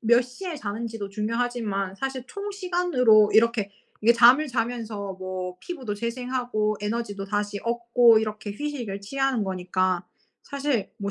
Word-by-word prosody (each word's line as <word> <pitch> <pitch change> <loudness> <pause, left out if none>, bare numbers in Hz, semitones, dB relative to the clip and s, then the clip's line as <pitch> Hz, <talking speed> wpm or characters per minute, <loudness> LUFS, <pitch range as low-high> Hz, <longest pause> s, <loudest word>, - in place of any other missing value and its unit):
몇 235 +2 +4
시에 320 +8 -7
자는지도 225 -3 -5
중요하지만 215 -2 -2
사실 265 +1 -3
총 405 0 -5
시간으로 345 - +3
이렇게 220 -3 +3 0.3
이게 230 +2 +6
잠을 245 +6 +6
자면서 225 -5 -3
뭐 185 -1 -5
피부도 260 - -5
재생하고 235 -2 -1
에너지도 210 -2 -3
다시 205 0 -2
얻고 235 -1 +4
이렇게 210 -1 -4
휴식을 240 -6 -4
취하는 270 +2 0
거니까 185 -1 -1 0.4
사실 280 -6 -2
뭐 200 0 -3
230 Hz, 325 characters per minute, -25 LUFS, 205-250 Hz, 0.4 s, 이게